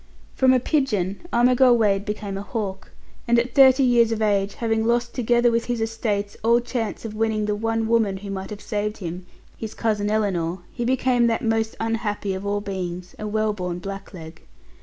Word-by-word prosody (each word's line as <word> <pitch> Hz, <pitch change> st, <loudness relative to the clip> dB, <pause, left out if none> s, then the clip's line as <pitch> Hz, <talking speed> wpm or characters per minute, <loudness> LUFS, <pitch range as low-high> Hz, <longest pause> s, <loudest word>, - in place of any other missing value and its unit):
From 260 Hz, -1 st, +4 dB
a 255 Hz, -, +4 dB
pigeon 215 Hz, -, 0 dB
Armigell 245 Hz, +1 st, +5 dB
Wade 200 Hz, -3 st, +2 dB
became 210 Hz, -1 st, -4 dB
a 195 Hz, -, -4 dB
hawk, 200 Hz, -2 st, -5 dB, 0.4 s
and 235 Hz, 0 st, +4 dB
at 235 Hz, +1 st, 0 dB
thirty 270 Hz, 0 st, +6 dB
years 235 Hz, -2 st, +4 dB
of 225 Hz, -, -1 dB
age, 200 Hz, -2 st, +1 dB
having 225 Hz, -1 st, 0 dB
lost 235 Hz, +1 st, 0 dB
together 240 Hz, -1 st, +2 dB
with 230 Hz, 0 st, 0 dB
his 240 Hz, -1 st, -2 dB
estates 220 Hz, -2 st, -2 dB
all 235 Hz, +1 st, +4 dB
chance 240 Hz, -2 st, -4 dB
of 220 Hz, -, -5 dB
winning 215 Hz, -1 st, 0 dB
the 210 Hz, -, 0 dB
one 225 Hz, +1 st, -1 dB
woman 220 Hz, -4 st, +2 dB
who 200 Hz, +1 st, -7 dB
might 190 Hz, -1 st, -5 dB
have 210 Hz, -1 st, -8 dB
saved 210 Hz, 0 st, -2 dB
him 180 Hz, -1 st, -6 dB, 0.3 s
his 220 Hz, -1 st, -6 dB
cousin 210 Hz, -2 st, 0 dB
Ellinor 190 Hz, -5 st, 0 dB
he 240 Hz, -, -4 dB
became 250 Hz, -1 st, +2 dB
that 230 Hz, +2 st, 0 dB
most 225 Hz, -1 st, 0 dB
unhappy 220 Hz, -3 st, -2 dB
of 190 Hz, +2 st, -5 dB
all 205 Hz, 0 st, 0 dB
beings, 180 Hz, -3 st, -5 dB
a 215 Hz, -, -4 dB
well 215 Hz, 0 st, 0 dB
born 180 Hz, -3 st, -4 dB
blackleg. 180 Hz, -4 st, -8 dB
220 Hz, 190 wpm, -23 LUFS, 200-235 Hz, 0.4 s, thirty